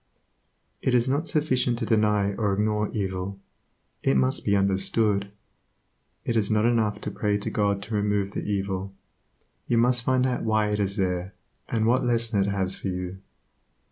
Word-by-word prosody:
It 130 - +1
is 120 +1 +3
not 145 +5 0
sufficient 130 -6 +1
to 115 - -2
deny 105 -2 +2
or 100 0 0
ignore 105 +1 0
evil; 95 -1 -3 0.6
it 70 - +2
must 65 0 +2
be 100 - +2
understood. 100 +1 +1 1.0
It 115 - -1
is 105 -3 +1
not 110 0 +2
enough 115 -3 +1
to - - -4
pray 105 -1 0
to 105 - -4
God 100 -1 0
to 110 +2 -7
remove 105 -1 0
the - - -4
evil; 95 -1 -3 0.7
you 120 - +2
must 125 +1 +3
find 130 +1 +2
out 125 -1 -1
why 110 -1 +1
it 105 - -1
is 100 -1 0
there, 95 -1 -2 0.3
and 110 -1 0
what 125 +3 +3
lesson 115 -3 +1
it 95 - +1
has 95 -1 0
for - - -6
you. 90 0 -4
105 Hz, 170 wpm, -26 LUFS, 100-115 Hz, 1.0 s, is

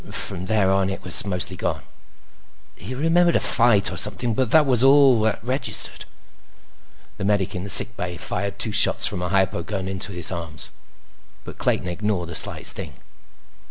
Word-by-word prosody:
From 90 - -4
there 105 -3 +1
on, 95 0 0
it 95 - -7
was 90 +3 0
mostly 90 -1 -3
gone. - - -4 0.9
He 130 - -8
remembered 170 +4 +1
a - - +3
fight 115 -4 +2
or - - -7
something, 115 +3 +4
but 125 +1 -1
that 155 +4 +4
was 125 -3 +1
all 135 -3 +5
that 110 -1 -2
registered. 130 +4 -1 1.1
The 105 - -6
medic 100 -2 -1
in 90 -2 -6
the 100 - -8
sick 115 +4 +6
bay 90 -4 -6
fired 100 +3 -4
two 110 - -2
shots - - +3
from 90 - -1
a 90 - -3
hypo 95 -2 0
gun 95 0 -6
into 95 +1 -4
both 90 -1 -2
arms, 85 -3 -6 0.7
but - - -12
Clayton - - -1
ignored 90 -1 -3
the - - -7
slight - - +1
sting. - - +1
100 Hz, 180 wpm, -21 LUFS, 90-120 Hz, 1.1 s, sick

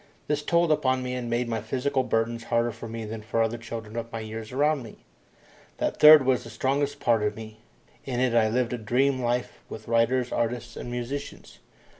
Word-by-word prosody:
This 150 0 0
told 170 +1 +2
upon 130 -3 +1
me 125 0 -3
and 125 -2 -4
made 120 +1 0
my 115 -2 -2
physical 130 +4 -1
burdens 115 -1 -1
harder 120 0 +1
for 115 - -9
me 115 0 -6
than 110 +1 -6
for 115 +2 -2
other 115 +1 -2
children 115 -1 -7
of 115 0 -5
my 115 - -4
years 110 +1 -7
around 145 +2 +1
me. 115 -3 -13 0.7
That - - -2
third 150 -2 +9
was 130 -1 +2
the 115 - -10
strongest 135 +5 -1
part 115 -2 +2
of 105 0 -1
me. 110 -1 -10 0.4
In 125 -3 -3
it 125 -2 +2
I 110 -2 +4
lived 125 +1 0
a 120 - -3
dream 130 +4 +1
life 120 0 -2
with 110 - -9
writers, 120 +2 +2
artists, 120 0 -2
and - - -7
musicians. 125 +4 -6
120 Hz, 205 wpm, -26 LUFS, 115-130 Hz, 0.7 s, third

